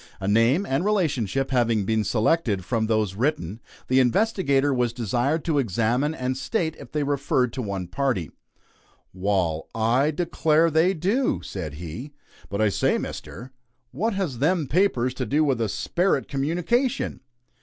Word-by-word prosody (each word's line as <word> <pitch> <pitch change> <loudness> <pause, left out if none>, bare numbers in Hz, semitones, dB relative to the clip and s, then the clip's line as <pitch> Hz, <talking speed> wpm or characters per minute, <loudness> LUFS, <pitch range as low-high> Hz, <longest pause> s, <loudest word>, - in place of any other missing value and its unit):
A 95 - -4
name 115 - +3
and 135 +1 0
relationship 135 - 0
having 115 -5 +2
been 110 +1 +1
selected 110 - +1
from 110 0 0
those 110 -3 +1
written, 110 - -1 0.3
the 130 +1 +3
investigator 140 - +2
was 125 -2 0
desired 125 +7 -1
to 155 -4 +1
examine 120 - 0
and 130 -1 -2
state 160 - -2
if - - -11
they 150 -1 0
referred 140 -4 0
to 130 - -3
one 100 -4 -3
party. 105 - -1 0.8
"Wal, 90 -4 -1
I 120 +6 +2
declare 160 0 +2
they 165 +5 +3
do!" 205 - 0
said 80 -7 -6
he. 90 - -7 0.4
"But 100 +1 -2
I 110 - +4
say - - +1
Mister, 125 +3 -7 0.4
what 210 - -1
has 180 -11 -2
them 160 +3 +2
papers 130 -6 +1
to - - -3
do 150 +3 +2
with 135 -6 +1
a 110 - 0
sperit 175 - 0
communication?" 175 - 0
130 Hz, 155 wpm, -24 LUFS, 110-160 Hz, 0.8 s, I